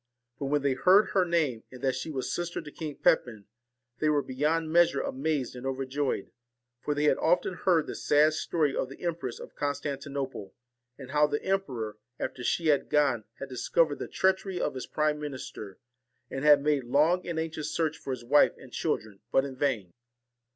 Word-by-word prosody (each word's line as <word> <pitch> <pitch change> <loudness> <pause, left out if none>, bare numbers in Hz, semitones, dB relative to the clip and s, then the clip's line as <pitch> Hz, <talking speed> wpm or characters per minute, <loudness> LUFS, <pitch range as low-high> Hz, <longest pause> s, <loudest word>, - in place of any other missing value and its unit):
But, 140 - -3
when 145 0 +1
they 140 -1 +2
heard 185 +10 +5
her 190 -2 +3
name, 155 -9 0
and 130 - -10
that 135 -1 +2
she 130 +5 -4
was 135 -4 -3
sister 175 0 -3
to 150 -2 -9
King 155 -2 -6
Pepin, 120 -8 +1 0.5
they 155 - +2
were 145 -2 +2
beyond 155 +5 0
measure 170 -5 +5
amazed 135 -2 -2
and 125 - -8
overjoyed; 135 -2 -2 0.5
for 150 +3 -2
they 145 - 0
had 150 - +3
often 175 +2 +2
heard 175 -3 +2
the - - -5
sad 150 +1 +3
story 155 -2 0
of 130 - -1
the 135 - -11
Empress 165 -8 -3
of - - -10
Constantinople, 140 -6 -4 0.4
and 130 -2 -10
how 150 0 +4
the 145 0 -2
emperor, 125 - -2 0.2
after 125 - -4
she 165 +5 +1
had 145 -2 +2
gone, 140 -7 +2
had 135 - -5
discovered 145 +4 +1
the - - -4
treachery 190 0 0
of - - -1
his 130 - -6
prime 150 -1 0
minister, 130 -8 -7 0.5
and 135 - -4
had 145 -2 +6
made 145 -4 +1
long 155 +8 +3
and 170 -2 -3
anxious 160 -2 -3
search 160 -2 0
for - - -9
his 125 -3 -4
wife 145 +4 +5
and - - -14
children, 105 -3 -2
but 135 - +3
in 135 -2 -6
vain. 120 -10 -1
145 Hz, 190 wpm, -29 LUFS, 130-160 Hz, 0.5 s, had